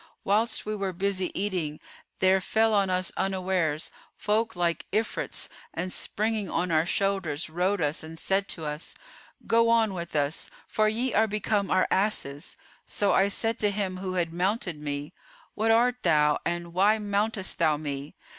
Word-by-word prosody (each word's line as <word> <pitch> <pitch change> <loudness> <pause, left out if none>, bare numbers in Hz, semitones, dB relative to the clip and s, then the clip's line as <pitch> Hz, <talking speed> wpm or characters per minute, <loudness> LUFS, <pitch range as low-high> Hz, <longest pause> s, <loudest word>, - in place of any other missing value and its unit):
Whilst 215 +4 +1
we 215 0 -2
were 195 -2 -2
busy 190 0 -1
eating, 180 -7 -2 0.4
there 190 0 +4
fell 220 +3 +2
on 200 -2 +3
us 185 0 +1
unawares, 185 -5 0 0.2
folk 220 +1 0
like 170 -1 0
Ifrits[FN#434] 220 +1 -2 0.3
and 185 +1 -3
springing 215 -2 -1
on 175 +1 -1
our 160 +1 +3
shoulders 180 -6 -1
rode 180 +4 0
us[FN#435] 150 +1 0
and 160 +1 -9
said 195 +2 +1
to 160 -3 -3
us, 150 +2 -5 0.5
'Go 230 0 +4
on 225 -3 +3
with 170 -2 -6
us; 145 +1 0 0.2
for 215 0 +2
ye 235 +2 0
are 220 +1 +4
become 210 -1 0
our 185 0 +3
asses.' 155 -8 -1 0.3
So 205 -1 +1
I 195 - +4
said 225 +3 -1
to 210 - +3
him 195 -2 -2
who 185 0 -4
had 170 -2 0
mounted 180 -3 -1
me, 145 +2 -4 0.4
'What 220 +1 0
art 240 +2 +4
thou 150 -3 +3
and 170 0 -3
why 200 +4 +4
mountest 205 -1 -1
thou 155 -3 +3
me? 145 -1 -5
190 Hz, 165 wpm, -27 LUFS, 170-210 Hz, 0.5 s, there